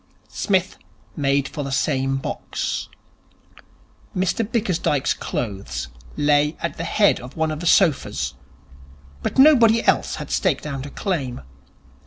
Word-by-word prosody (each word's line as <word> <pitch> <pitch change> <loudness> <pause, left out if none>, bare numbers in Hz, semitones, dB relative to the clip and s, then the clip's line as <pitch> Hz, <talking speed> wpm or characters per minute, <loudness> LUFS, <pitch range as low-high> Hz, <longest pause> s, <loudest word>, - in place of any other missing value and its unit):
Psmith 190 -3 0 0.4
made 140 -2 +1
for 145 - -5
the 135 - -5
same 135 -1 +1
box. 135 - -4 1.3
Mr 190 +5 +1
Bickersdyke's 185 - 0
clothes 100 -4 -4 0.3
lay 145 +1 +2
at 170 - -3
the 165 - -3
head 205 +5 +3
of 125 +4 -11
one 160 -1 +1
of 155 - -4
the 175 - -3
sofas, 140 - +2 0.9
but - - -3
nobody 235 -6 +6
else - - +2
had - - -7
staked - - +1
out 140 -2 -4
a - - -8
claim. 140 - -3
150 Hz, 130 wpm, -22 LUFS, 135-190 Hz, 1.3 s, nobody